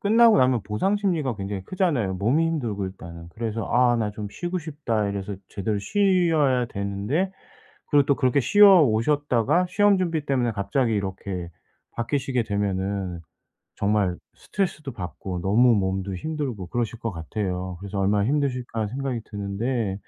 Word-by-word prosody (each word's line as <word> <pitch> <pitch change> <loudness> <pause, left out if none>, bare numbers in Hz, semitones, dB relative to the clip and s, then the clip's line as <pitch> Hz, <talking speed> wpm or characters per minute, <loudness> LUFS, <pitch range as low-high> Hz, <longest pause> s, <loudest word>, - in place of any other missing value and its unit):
끝나고 225 +1 +5
나면 125 -3 +3
보상 105 - 0
심리가 165 - 0
굉장히 100 -1 -4
크잖아요, 145 - 0
몸이 125 - +2
힘들고 115 -12 -2
일단은. 85 -3 -10
그래서 115 +3 -3
'아 120 -1 +4
나 110 -2 -1
좀 105 0 -6
쉬고 175 - -3
싶다.' 140 - -2
이래서 100 0 -4
제대로 100 +1 -2
쉬어야 165 - +2
되는데 100 - -2 0.6
그리고 145 -2 +4
또 140 - +4
그렇게 130 +1 +2
쉬어 195 +4 +7
오셨다가 145 +5 +2
시험 205 +1 +3
준비 165 -5 -1
때문에 125 -4 +1
갑자기 105 +4 0
이렇게 95 -3 -4 0.4
바뀌시게 125 +1 -1
되면은 95 -3 -2 0.6
정말 100 -3 +1 0.2
스트레스도 155 -8 -3
받고 90 -1 -6
너무 115 +5 +4
몸도 95 -1 -1
힘들고 130 - -4
그러실 115 +3 -3
것 115 - -3
같아요. 90 +1 -4
그래서 100 +1 -5
'얼마나 100 +1 +2
힘드실까?' 125 -5 -1
생각이 130 0 -3
드는데 100 +1 -3
115 Hz, 355 characters per minute, -24 LUFS, 100-145 Hz, 0.6 s, 쉬어